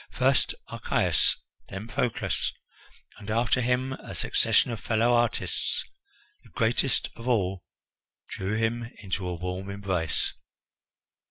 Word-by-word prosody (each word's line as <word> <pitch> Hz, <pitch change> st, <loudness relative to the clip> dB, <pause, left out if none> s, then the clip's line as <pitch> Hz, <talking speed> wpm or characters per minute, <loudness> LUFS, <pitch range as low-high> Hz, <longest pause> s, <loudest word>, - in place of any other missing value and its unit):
First 130 Hz, +1 st, +2 dB
Archias, -, -, +2 dB, 0.3 s
then 95 Hz, +3 st, -6 dB
Proclus, 115 Hz, +1 st, 0 dB, 0.7 s
and 105 Hz, 0 st, -9 dB
after 115 Hz, +3 st, +2 dB
him 125 Hz, +2 st, +1 dB
a -, -, -8 dB
succession -, -, +3 dB
of 115 Hz, -, -4 dB
fellow 115 Hz, +3 st, +2 dB
artists 120 Hz, -1 st, +1 dB, 0.6 s
the -, -, -18 dB
greatest 120 Hz, +3 st, +1 dB
of 115 Hz, +1 st, -8 dB
all 95 Hz, -7 st, +1 dB, 0.6 s
drew 100 Hz, +3 st, -2 dB
him 120 Hz, +1 st, 0 dB
into 95 Hz, -1 st, -2 dB
a 90 Hz, -, -2 dB
warm 90 Hz, +3 st, -4 dB
embrace. 95 Hz, -5 st, -1 dB
110 Hz, 115 wpm, -28 LUFS, 95-120 Hz, 0.7 s, succession